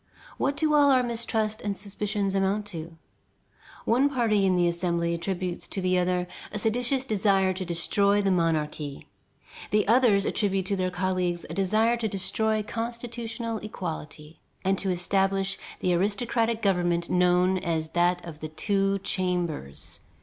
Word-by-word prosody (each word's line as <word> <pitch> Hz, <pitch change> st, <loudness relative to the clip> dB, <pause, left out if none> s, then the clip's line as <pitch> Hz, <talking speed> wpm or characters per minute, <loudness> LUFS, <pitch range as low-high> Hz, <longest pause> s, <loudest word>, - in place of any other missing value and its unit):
What 280 Hz, +1 st, 0 dB
do 310 Hz, 0 st, +2 dB
all 290 Hz, -1 st, +6 dB
our 260 Hz, -2 st, +5 dB
mistrust 225 Hz, -2 st, -1 dB
and 200 Hz, -2 st, -2 dB
suspicions 200 Hz, 0 st, -2 dB
amount 195 Hz, +2 st, +1 dB
to? 165 Hz, 0 st, -7 dB, 0.9 s
One 255 Hz, +5 st, +3 dB
party 220 Hz, -7 st, +2 dB
in 185 Hz, -, +3 dB
the 175 Hz, -1 st, +3 dB
Assembly 170 Hz, -1 st, 0 dB
attributes 180 Hz, +1 st, -3 dB
to -, -, -4 dB
the 185 Hz, -1 st, +2 dB
other 180 Hz, 0 st, 0 dB, 0.2 s
a 210 Hz, -, -3 dB
seditious 245 Hz, +5 st, 0 dB
desire 195 Hz, -4 st, +2 dB
to 185 Hz, +1 st, -4 dB
destroy 200 Hz, +4 st, +2 dB
the 200 Hz, -1 st, +2 dB
monarchy. 155 Hz, -4 st, -1 dB, 0.6 s
The 210 Hz, -1 st, +2 dB
others 220 Hz, -4 st, +4 dB
attribute 195 Hz, -3 st, 0 dB
to 200 Hz, -, 0 dB
their 185 Hz, -1 st, 0 dB
colleagues 180 Hz, -1 st, -1 dB
a -, -, -4 dB
desire 215 Hz, +5 st, +2 dB
to 230 Hz, -2 st, -1 dB
destroy 215 Hz, +2 st, 0 dB
constitutional 230 Hz, 0 st, -4 dB
equality 160 Hz, -6 st, -7 dB, 0.3 s
and 190 Hz, +1 st, +3 dB
to 195 Hz, -, -1 dB
establish 195 Hz, +2 st, +1 dB, 0.2 s
the 180 Hz, -, +2 dB
aristocratic 225 Hz, +4 st, 0 dB
government 175 Hz, -3 st, +1 dB
known 180 Hz, +1 st, +3 dB
as 160 Hz, -3 st, -2 dB
that 175 Hz, +1 st, +1 dB
of 160 Hz, -3 st, -9 dB
the 155 Hz, -, -5 dB
Two 195 Hz, +4 st, +1 dB
Chambers. 175 Hz, -, -2 dB
195 Hz, 150 wpm, -27 LUFS, 175-220 Hz, 0.9 s, all